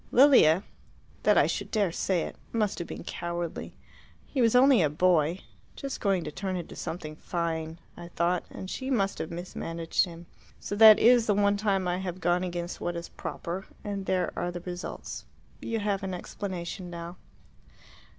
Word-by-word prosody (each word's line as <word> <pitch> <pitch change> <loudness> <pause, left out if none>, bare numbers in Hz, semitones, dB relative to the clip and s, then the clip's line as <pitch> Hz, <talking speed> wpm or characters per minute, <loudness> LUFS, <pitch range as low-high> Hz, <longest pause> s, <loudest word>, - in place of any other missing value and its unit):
Lilia 240 - +6 0.6
that - - +4
I - - +6
should - - -2
dare 205 -5 +1
to - - -10
say 180 -4 +1
it! - - -6 0.2
must 215 -3 0
have 170 - -4
been - - -7
cowardly. 170 -1 -4 0.5
He 270 - -2
was 230 0 +4
only 255 -3 +6
a 155 - +3
boy 170 +2 +2 0.3
just 275 -1 -5
going 195 -4 +1
to 150 - -5
turn 190 +3 -3
into 175 - -6
something 160 -2 -5
fine, 165 -1 -3 0.2
I 175 - -9
thought 170 +1 0
and 190 - -8
she 260 +7 -4
must 200 -7 0
have 160 - -3
mismanaged 170 -1 -2
him. 170 -1 -10 0.3
So 205 - -4
that 215 -1 +10
is 235 0 +5
the 205 - +3
one 200 0 +3
time 200 -3 0
I 175 0 0
have 185 -1 -4
gone 175 0 +1
against 175 -1 -4
what 175 - -2
is 170 0 -6
proper, 180 +3 -5 0.2
and 200 -2 -4
there 185 -1 0
are 175 - -2
the 175 0 -6
results. 180 0 -6 0.4
You 230 - -2
have 205 -2 -1
an 190 -2 -3
explanation 180 -1 -5
now." 170 +1 -7
180 Hz, 180 wpm, -28 LUFS, 170-205 Hz, 0.6 s, that